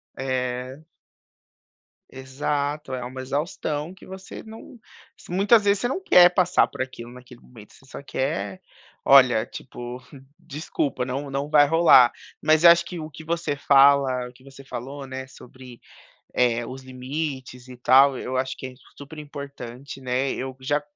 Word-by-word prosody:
É. 130 0 -3 1.3
Exato, 140 +2 -3
é 125 - -5
uma 130 +1 -7
exaustão 150 +3 -3
que - - -19
você 190 0 -9
não 225 +2 -13 0.5
muitas 205 +5 +4
vezes 200 0 +2
você 245 - -1
não 275 +9 -3
quer 180 - +7
passar 180 0 +3
por - - -7
aquilo 120 -2 -7
naquele 125 -1 -14
momento, 110 -4 -16
você 135 - -21
só 135 - -10
quer, 105 -9 -3 0.5
olha 125 -5 +6
tipo, 120 0 -9 0.4
desculpa, 145 -3 -3
não 135 +2 -4
não 140 +1 -3
vai 145 -2 +6
rolar. 155 -6 +6 0.3
Mas 155 +1 +3
eu 170 - +10
acho 170 0 +3
que 170 0 -8
o 155 0 -7
que 160 - -11
você 165 -2 -2
fala 140 -2 +4
o 125 - -14
que 130 - -22
você 135 0 -14
falou, 135 +3 -7
né, 130 0 -6
eh, - - -15
sobre 130 -1 -14 0.9
os 130 +1 -9
limites 130 -1 -6
e 125 - -10
tal 135 +2 +5
eu 130 +1 -4
acho 130 0 -2
que - - -7
é 130 - -13 0.2
super 145 +2 -11
importante, 140 -3 -9
né. 130 +1 -1
Eu 130 0 -5
já 145 +3 0
135 Hz, 160 wpm, -24 LUFS, 130-150 Hz, 1.3 s, eu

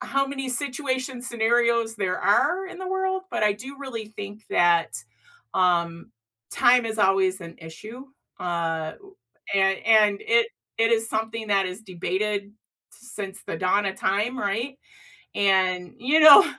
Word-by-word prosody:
how 275 0 0
many 270 -1 -5
situation, 260 -1 -2
scenarios, 235 -1 +1
there 185 -2 -1
are 360 - +2
in 370 - -10
the 375 - -6
world, 380 0 -1
but - - -2
I 210 - +4
do 260 +7 -10
really 235 -6 -6
think 205 0 -9
that, 170 -1 +2 0.5
um, 170 -2 0 0.4
time 245 0 +4
is 220 0 -4
always 190 -1 +2
an 170 -1 -10
issue. 215 +11 -10 0.4
Uh, 165 -2 -2
o 390 -1 -18 0.4
and 195 0 +2
and 210 -2 +4
it 230 0 +2 0.3
it 225 0 +3
is 225 0 +1
something 225 0 -3
that 195 -1 +2
is 185 +4 -7
debated 200 +2 -3 0.4
since 205 -5 -8
the - - -4
dawn 195 +4 +1
of 190 - -2
time, 205 +7 -1
right? 235 +7 -3 0.6
And, 185 -1 +1
you 275 +7 +2
know, 310 +5 +10
215 Hz, 150 wpm, -24 LUFS, 190-250 Hz, 0.6 s, know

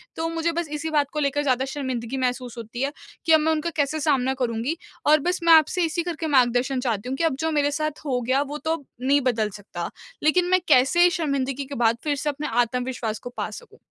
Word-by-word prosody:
तो 325 - -2
मुझे 330 0 -1
बस 335 0 -2
इसी 305 +1 -3
बात 295 -2 +1
को 305 - -1
लेकर 285 0 +1
ज़्यादा 260 -2 +1
शर्मिंदगी 260 -3 -4
महसूस 250 -1 -2
होती 230 +2 -6
है 275 +1 0 0.3
कि 325 - +2
अब 315 - +7
मैं 315 +1 +2
उनका 315 +1 -1
कैसे 300 +1 0
सामना 265 -4 +2
करूँगी? 240 +5 -1 0.3
और 305 +1 +6
बस 355 +5 -1
मैं 335 -1 +7
आपसे 320 +3 +5
इसी 330 +1 -1
करके 330 -2 -3
मार्गदर्शन 255 -1 +2
चाहती 235 -2 -2
हूँ 265 - -1
कि - - -1
अब 325 -5 +2
जो 320 0 0
मेरे 290 -1 +2
साथ 305 0 -2
हो 260 -4 0
गया 260 +3 +1
वो 290 +1 -4
तो 315 +1 -2 0.3
नहीं 275 +3 +3
बदल 225 -5 +1
सकता, 195 -4 -7 0.3
लेकिन 350 +4 +4
मैं 370 - +5
कैसे 315 +6 +5
शर्मिंदगी 280 -5 -1
के 280 +1 -7
बाद 230 -1 +2
फिर 295 -2 0
से 290 +2 -2
अपने 295 +1 -3
आत्मविश्वास 240 -2 -2
को - - -7
पा - - -2
सकूँ। 475 - -12
280 Hz, 230 wpm, -24 LUFS, 250-315 Hz, 0.3 s, अब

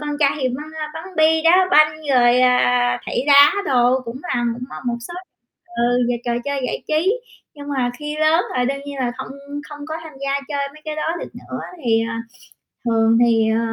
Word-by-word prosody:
con 295 - -5
trai 280 -1 +4
thì 260 - +1
bắn 275 +5 -5 0.3
bắn 320 +2 -7
bi, 315 0 +4
đá 365 +3 +5
banh, 305 -1 +6 0.2
rồi, 245 -1 +4
à, 245 -1 +3
thảy - - -1
đá 285 0 +8 0.2
đồ 250 -1 +3
cũng 230 +2 -6
là 245 -9 -1
cũng, 245 - -9
ờ, - - -8
một 240 -1 0
số 345 - -8 0.6
ừ, 245 +1 +2
về 245 - 0
trò 240 - -1
chơi 280 -1 -2
giải - - -4
trí. 330 +7 +2 0.4
Nhưng 285 -1 -10
mà 260 -4 0
khi 300 0 -5
lớn 310 +3 +3
là 250 - +1
đương 275 +2 -2
nhiên 285 0 -6
là 245 -2 -1
không - - -6 0.4
không 295 -1 -10
có 315 - -4
tham 320 -2 -10
gia 275 0 -1
chơi 280 -1 -2
mấy 305 - -16
cái 310 -1 -5
đó 320 +2 -2
được - - -6
nữa. - - -8 0.3
Thì, 225 -1 +3
à, 230 0 -4 0.6
thường 225 -1 +3
thì, 225 -2 +3
ờ, 225 - +1
275 Hz, 215 wpm, -20 LUFS, 245-305 Hz, 0.6 s, đá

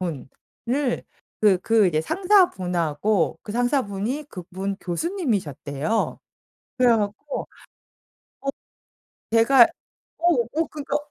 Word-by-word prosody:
분을 235 - -4 0.4
그, 205 -4 +5
그 215 0 +3
예 155 - +3
상사분하고 180 - +2
그 205 - -7
상사분이 245 +1 -1
그분 190 +2 -5
교수님이셨대요. 195 - -2 0.6
그래 250 -1 +5
갖고 210 +8 -3 0.9
어 275 - -2 0.8
제가 235 +3 +7 0.6
어 335 - -11 0.3
어 325 +1 +1
그러니까 290 -2 -3
215 Hz, 200 characters per minute, -24 LUFS, 180-275 Hz, 0.9 s, 제가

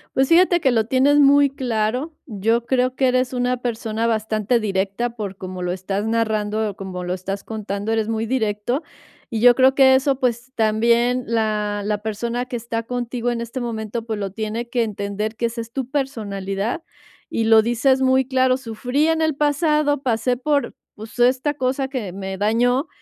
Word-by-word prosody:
Pues 265 0 +3
fíjate 350 +2 +5
que 270 -5 +2
lo 225 -2 +1
tienes 275 +3 +4
muy 280 0 +6
claro. 250 +3 -2
Yo 225 +1 0
creo 255 0 +1
que 265 - +3
eres 255 0 +1
una 250 0 0
persona 225 -1 -2
bastante 220 +1 0
directa 200 +3 -2
por 200 -4 -5
como 185 -1 -7
lo 180 - -1
estás 195 +3 -3
narrando 220 -1 0
o - - -15
como 185 -2 -6
lo 180 - -2
estás 195 +2 -5
contando, 215 0 -3
eres 220 -1 0
muy 225 0 -1
directo. 225 +3 -1 0.5
Y 230 -4 -2
yo 245 +1 +7
creo 260 0 +5
que 265 -1 +6
eso, 270 0 +1
pues, 245 0 -1
también 235 +3 +2
la 210 -2 0
la 210 -1 -1
persona 230 +3 -3
que 250 -1 -4
está 230 0 -4
contigo 245 0 -3
en 235 - -3
este 235 +2 -5
momento, 225 -1 -4
pues, 220 -2 -3
lo 195 -2 -3
tiene 220 +3 -4
que 240 -1 +1
entender, 210 +1 -4
que 235 - 0
esa 230 0 -3
es 230 - -10
tu 260 0 -4
personalidad. 215 - -3 0.5
Y 225 - -1
lo 220 0 +6
dices 250 +4 +2
muy 260 0 +3
claro: 260 -1 +2
"Sufrí 250 +4 -1
en 325 0 +1
el 315 -1 +2
pasado, 295 -1 +1
pasé 245 0 +1
por, 285 +3 -1 0.2
pues, 220 +3 -11
esta 255 +4 +3
cosa 265 -1 -1
que 245 -9 -4
me 190 0 -5
dañó", 245 - +1
235 Hz, 185 wpm, -21 LUFS, 215-260 Hz, 0.5 s, yo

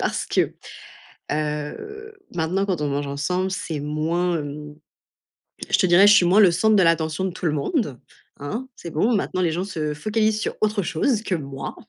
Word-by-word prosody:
parce - - -1
que, - - 0 0.8
heu, 155 - -4 0.2
maintenant 180 +4 0
quand 185 -6 -2
on 150 - 0
mange 140 +1 -2
ensemble, 180 +7 -1
c'est 180 -5 -4
moins, 160 +4 -1
hem. 150 0 -7 1.0
Je - - +4
te 185 - +3
dirais, 175 +3 +6
je 205 - +8
suis 180 -4 +5
moins 190 +5 +5
le 195 -4 +7
centre 220 +5 +3
de 195 - +5
l'attention 165 +1 +1
de 190 - 0
tout 180 -1 -4
le 155 - +2
monde, 150 - -1 0.4
hein. 220 - -5
C'est 170 - -8
bon, 210 +10 +1
maintenant 195 -2 -1
les 170 -3 +1
gens 175 +3 -2
se 155 -6 -3
focalisent 215 +6 0
sur - - -3
autre 210 -1 +1
chose 210 - 0
que 190 - -1
moi. 135 -3 -6
175 Hz, 190 wpm, -23 LUFS, 150-205 Hz, 1.0 s, je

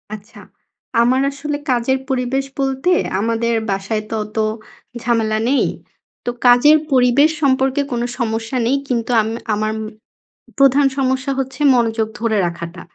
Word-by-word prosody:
আচ্ছা 215 +1 -15 0.6
আমার 255 +3 +3
আসলে 290 +1 -4
কাজের 250 +2 +1
পরিবেশ 265 +1 -1
বলতে 270 +5 0 0.3
আমাদের 230 +2 0 0.2
বাসায় 195 +3 -2
তো 225 - -3
অত 210 +1 -12 0.6
ঝামেলা 225 -2 0
নেই। 275 - +2 0.6
তো - - -1 0.2
কাজের 245 +6 +6
পরিবেশ 255 +3 +4
সম্পর্কে 265 0 +2
কোনো 240 -1 -1
সমস্যা 225 +1 -2
নেই। 270 +3 +2
কিন্তু 240 -2 -1
আম 215 - -3 0.2
আমার 215 +1 -1 0.9
প্রধান 275 0 +4
সমস্যা 265 0 0
হচ্ছে 265 +2 -5
মনোযোগ 225 -2 +1
ধরে 225 -1 0
রাখাটা। 170 0 -6
245 Hz, 130 wpm, -18 LUFS, 225-270 Hz, 0.9 s, কাজের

